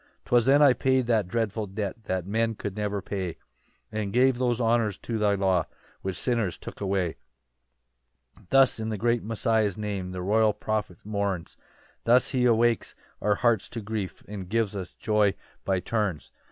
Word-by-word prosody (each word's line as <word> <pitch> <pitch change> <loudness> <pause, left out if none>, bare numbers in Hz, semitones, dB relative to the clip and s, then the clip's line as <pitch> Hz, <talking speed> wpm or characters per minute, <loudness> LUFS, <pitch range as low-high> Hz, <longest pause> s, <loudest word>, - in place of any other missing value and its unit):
4 - - -19
"'Twas 120 -2 +4
then 140 +2 +6
I 140 -3 +7
paid 130 +1 +2
that 110 -5 +2
dreadful 110 +1 -1
debt 105 +3 -5
"That 95 -3 -2
men 115 +3 0
could 100 -2 -5
never 105 -2 -2
pay, 95 -4 -4 0.5
"And 105 -2 -2
gave 125 +1 +3
those 120 -2 +1
honours 115 -4 +2
to 115 -2 -4
thy 105 -1 +3
law 95 -3 +2 0.4
"Which 95 -1 -3
sinners 115 -8 0
took - - -10
away." 95 -4 -1 1.2
5 100 - -23
Thus 135 -3 +5
in 110 0 -3
the 110 - -2
great 120 +3 +1
Messiah's 110 -2 +1
name, 100 -3 -3
The 90 -1 -5
royal 110 +2 +3
prophet 105 -6 -3
mourns; 100 -5 -2 0.5
Thus 120 +2 +4
he 125 -1 +1
awakes 120 -1 +2 0.3
our 105 -1 +2
hearts 115 -3 +1
to 115 - -5
grief, 105 -2 -4
And 100 -3 -7
gives 110 -1 0
us 95 -3 -6
joy 105 -3 +2 0.3
by 95 -1 +1
turns. 100 -6 -2
105 Hz, 175 wpm, -27 LUFS, 100-115 Hz, 1.2 s, I